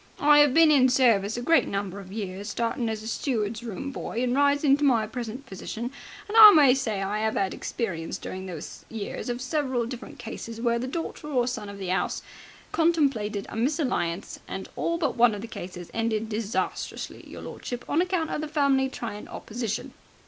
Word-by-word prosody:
I 295 0 +7
'ave 290 -3 +2
been 325 0 +6
in 260 -3 +6
service 230 -5 +3
a 245 - -3
great 330 +5 +4
number 200 -1 -3
of 190 -1 -11
years, 200 -1 -5
startin' 230 +2 -1
as 220 0 -4
steward's 225 -4 -1
room 235 +4 -5
boy 240 -2 -3
and 250 0 +1
rising 285 0 +4
to 295 - -3
my 240 -6 +4
present 240 +4 -6
position, 225 +5 -5 0.4
and 420 - -5
I 435 -2 +12
may 285 -5 +7
say 220 -7 -1
I 210 +2 -1
'ave 220 - -1
'ad 195 -1 0
experience 170 -9 -3
during 190 0 -6
those 170 -5 -8
years 225 +2 -5
of 245 +1 -3
several 260 -3 0 0.3
cases 230 -1 -7
where 235 0 +1
the 255 - -3
daughter 320 +1 -5
or 255 -5 +1
son 245 -5 -4
of 200 - -8
the 190 -2 -3
'ouse 190 - -1 0.5
contemplated 275 -12 +1
a - - -8
misalliance, 235 - -1
and - - -5
all 335 - 0
but 335 - -1
one 235 -2 +5
of 200 - -6
the 230 - -6
cases 180 -5 -8
ended 225 -1 -1
disastrously, 220 +1 -3
your - - -9
lordship, 245 0 -6
on 310 - +2
account 360 -3 -1
of - - -2
the 310 - -3
family 280 -3 +2
trying 225 -5 -6
opposition. 225 -2 -4
235 Hz, 190 wpm, -26 LUFS, 210-275 Hz, 0.5 s, I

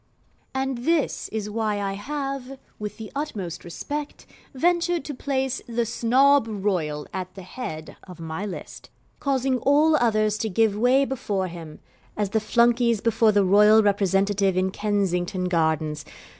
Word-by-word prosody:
And 265 -2 -1
this 320 +4 0
is 215 -2 -4
why 210 -1 -1
I 195 -1 -2
have, 275 +3 -5 0.2
with 210 -1 -6
the 220 -2 -8
utmost 210 - -4
respect, 290 - -6 0.3
ventured 345 +2 +1
to 295 - -5
place 265 -1 -2
The 235 0 -1
Snob 260 +3 +3
Royal 180 -8 -2
at 185 0 -5
the 190 - -9
head 170 -6 -7
of 180 -2 -12
my 160 +3 -5
list, 205 -3 -8 0.3
causing 265 -2 0
all 300 +4 +4
others 215 -5 +2
to 220 - -1
give 215 +1 +2
way 250 +5 +3
before 205 -8 -2
him, 165 -3 -10 0.4
as 205 -2 -1
the 220 - +2
Flunkeys 235 +1 +3
before 225 0 +3
the 205 -1 +3
royal 210 +3 +6
representative 195 -1 +2
in 185 0 +1
Kensington 190 -3 -1
Gardens. 160 -3 0
215 Hz, 145 wpm, -24 LUFS, 190-260 Hz, 0.4 s, royal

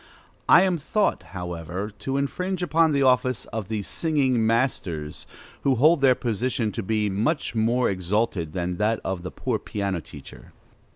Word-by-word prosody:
I 180 - +8
am 185 -3 +1
thought, 210 +8 0 0.2
however, 90 +3 -5
to 135 +5 -2
infringe 180 +6 -2
upon 165 -2 +3
the 140 -1 +2
office 125 -2 +2
of 110 -4 -3
the 110 -1 -3
singing 135 - +1
masters, 95 - -1 0.3
who 135 -2 +2
hold 155 +5 +4
their 130 -2 +5
position 120 -1 -1
to 115 - -4
be 105 +1 0
much 110 - -1
more 120 +3 +2
exalted 95 -3 -1
than 90 -1 -2
that 110 +1 +1
of 95 -2 -3
the 90 - -5
poor 120 -4 -2
piano 100 -4 -3
teacher. 75 -2 -13
115 Hz, 160 wpm, -25 LUFS, 95-135 Hz, 0.3 s, I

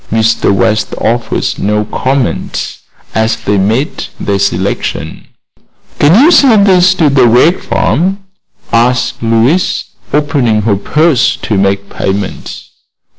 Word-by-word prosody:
Mr. 110 -1 +1
West 110 +3 0
offered 120 0 -2
no 105 +1 -1
comment 130 +3 -3 0.3
as 110 0 0
they 100 0 -1
made 110 +9 -1
their 100 -1 -1
selection. 95 -1 -3 0.7
"Can 160 +9 +4
you 330 - +5
send 235 -11 +5
this 185 -1 +4
to 165 -5 +2
the 130 -3 +4
Wegg 125 +10 +3
farm?" 185 +6 -1 0.6
asked 120 +1 +1
Louise, 115 +10 +1 0.3
opening 135 -8 0
her 105 -2 +1
purse 135 - +1
to 110 - -1
make 100 0 0
payment. 95 0 -4
115 Hz, 120 wpm, -11 LUFS, 105-150 Hz, 0.7 s, you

